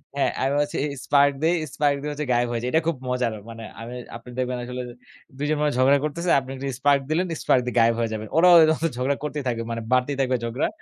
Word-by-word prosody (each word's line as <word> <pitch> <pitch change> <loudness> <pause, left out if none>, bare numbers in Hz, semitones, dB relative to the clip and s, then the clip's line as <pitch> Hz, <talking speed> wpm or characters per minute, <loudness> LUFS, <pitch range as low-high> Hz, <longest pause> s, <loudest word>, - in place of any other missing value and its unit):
হ্যাঁ, 140 - +1
আমি 135 - +1
বলছি 145 0 -1 0.3
স্পার্ক 140 0 +4
দিয়ে 165 +2 +3 0.2
স্পার্ক 145 -1 +2
দিয়ে 150 0 -3
হচ্ছে 150 0 -4
গায়েব 120 0 +2
হয়ে 115 -1 -2
যাই। 125 - -1
এটা 160 - +4
খুব 165 - +1
মজার। 125 -3 0 0.2
মানে 115 0 -9 0.2
আমি 120 +2 -7 0.2
আপনি 125 - -15
দেখবেন 125 0 -1
আসলে 125 0 -5 0.6
২ 145 - -2
জন 155 - +1
মানুষ 150 -2 +1
ঝগড়া 135 +2 +5
করতেছে। 170 +4 -3
আপনি 130 0 -11
একটু 135 +1 -5
স্পার্ক 140 0 +4
দিলেন 175 +4 +1 0.2
স্পার্ক 125 - +3
দিয়ে 125 - -4
গায়েব 115 0 +4
হয়ে 115 -1 0
যাবেন। 110 0 -5
ওরাও 180 +1 +7 0.3
হচ্ছে 165 - +1
ঝগড়া 135 +3 0
করতেই 150 -1 -3
থাকবে। 115 -1 -2
মানে 115 0 -3
বাড়তেই 130 +2 +2
থাকবে 130 -1 +1
ঝগড়া 115 +4 -1
135 Hz, 235 wpm, -24 LUFS, 125-145 Hz, 0.6 s, ওরাও